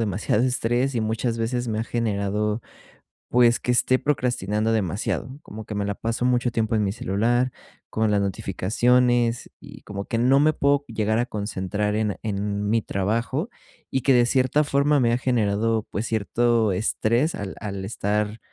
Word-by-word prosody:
demasiado 105 +1 0
estrés, 125 +1 0
y 115 - 0
muchas 110 +2 -1
veces 120 +2 -2
me 110 -1 -1
ha 110 - -1
generado, 105 -1 -1 0.7
pues, 120 -1 +4
que 125 - -1
esté 125 +1 +3
procrastinando 120 -6 0
demasiado, 110 - -2
como 110 +1 -9
que 110 - -6
me 100 -1 -2
la 100 0 -2
paso 115 +3 -3
mucho 125 -1 +2
tiempo 110 -1 0
en 105 - +2
mi 100 - 0
celular, 120 +5 0 0.4
con 110 0 0
las 100 -1 +2
notificaciones, 120 +5 +1
y - - -13
como 100 0 -6
que 115 - -2
no 130 +3 +4
me 155 +2 +4
puedo 140 0 +2
llegar 110 -1 0
a 120 - +1
concentrar 105 -1 -2
en 105 -2 -1
en 100 -1 -2
mi 115 +1 +2
trabajo. 115 - -1 0.4
Y 130 - 0
que 135 +2 +3
de 120 -1 +5
cierta 130 +4 +2
forma 145 0 +2
me 120 -2 +2
ha 120 - +2
generado, 110 -3 +1
pues, 105 +3 -2
cierto 115 0 +1
estrés 115 - 0
al 100 -1 -6
al 100 -2 -5
estar, 105 +1 -2
115 Hz, 170 wpm, -24 LUFS, 105-125 Hz, 0.7 s, de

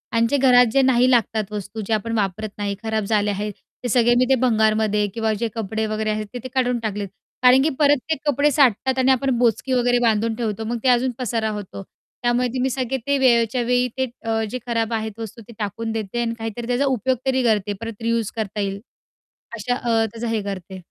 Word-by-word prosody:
आणि 230 - +4
जे 285 - +3
घरात 250 -2 +6
जे 275 - +5
नाही 255 -1 +4
लागतात 220 -3 +1
वस्तू 210 +1 -5
जे 225 - 0
आपण 220 +2 -1
वापरत 205 +1 -2
नाही, 205 -1 -2
खराब 220 -1 -1
झाले 210 0 +1
आहेत. 205 +1 -3 0.3
ते 245 - -2
सगळे 240 +1 +4
मी 255 - +4
ते - - +6
भंगारमध्ये 215 -3 +2
किंवा 225 -1 0
जे - - +2
कपडे 220 0 -2
वगैरे 215 0 -1
आहेत 215 0 -1
ते 245 - -4
ते - - -4
काढून 250 -2 +1
टाकलेत, 205 -1 -4 0.4
कारण 250 +1 +7
की 310 - +2
परत 290 0 +5
ते 315 - +2
कपडे 290 +1 +2
साठतात 265 -1 +2
आणि 260 +1 +4
आपण 260 -1 +1
बोचकी 245 +2 +1
वगैरे 245 -1 +3
बांधून 225 +1 +1
ठेवतो, 220 -2 -3
मग 235 +1 -2
ते 260 - +3
अजून 255 +1 -1
पसारा 230 -3 -1
होतो. 195 0 -9 0.4
त्यामुळे 240 +1 +2
ते 260 - -2
मी 265 - +1
सगळे 260 0 -2
ते 280 0 +2
वेळच्या 240 -2 +3
वेळी, 250 +1 +2
ते 260 - +1 0.4
जे 255 - -3
अ, 245 0 -13
खराब 230 0 0
आहेत 220 -1 -3
वस्तू 225 +1 -7
ते 235 - -12
टाकून 225 +2 -3
देते, 220 +1 -3
आणि 230 -1 -1
काहीतरी 225 +1 -5
त्याचा 250 +3 +1
उपयोग 255 +4 0
तरी 260 -1 +1
करते. 210 -3 +1
परत 230 -1 -7
रियूज 230 -2 0
करता 215 -2 -4
येईल, 195 0 -3 0.8
अशा 245 +3 -1
अ, 230 -3 +1
त्याचा 230 +1 -4
हे 215 - -1
करते. 190 -1 -6
230 Hz, 220 wpm, -22 LUFS, 215-250 Hz, 0.8 s, कारण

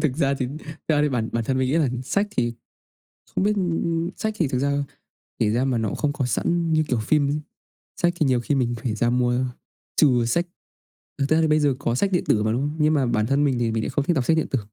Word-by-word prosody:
Thực 140 -5 0
ra 140 -3 +2
thì 130 -2 -2
thực 155 -1 -12
ra 150 - +3
bản 115 -4 -1
bản 115 -1 -1
thân 130 +2 0
mình 130 -1 +1
nghĩ 145 - 0
á 160 -4 +3
sách 200 +10 0
thì 120 - 0 0.8
không - - +1
biết, 210 +1 +3
ư, 185 -3 0
ư 165 +1 -1
sách, 220 0 -2
thì 165 - +1
thực 125 -1 -1
ra 140 +1 +1 0.7
kể 105 - +2
ra 120 +4 +1
mà 130 -3 0
nó 110 - -1
cũng - - -4
không 150 -2 0
có 140 -3 -2
sẵn 165 +8 0
như 155 0 +3
kiểu 125 - +1
phim. 145 +5 +1 0.6
Sách 175 0 +2
thì 160 -4 +1
nhiều 125 -2 +2
khi 145 - -1
mình 120 -3 0
phải 115 -4 -1
ra 120 +2 +1
mua, 125 +1 +1 0.5
trừ 125 -6 +4
sách 170 +10 0 0.7
thực 140 0 0
ra 160 +1 +3
thì 160 - +3
bây 155 0 +3
giờ 145 -3 +2
có 120 -4 -1
sách 195 +10 0
điện 180 - +1
tử 105 - +2
mà, 110 +1 +1
đúng 120 - 0
không? 145 +2 -2
Nhưng 155 +1 +4
mà 135 -4 +2
bản 110 -2 +1
thân 140 +4 +2
mình 130 -4 +1
thì 115 -1 0
mình 110 0 -1
lại - - -2
không 145 - 0
thích 175 - +1
đọc 135 -4 0
sách 160 - +3
điện 160 - 0
tử. 130 - +1
140 Hz, 275 wpm, -23 LUFS, 120-155 Hz, 0.8 s, trừ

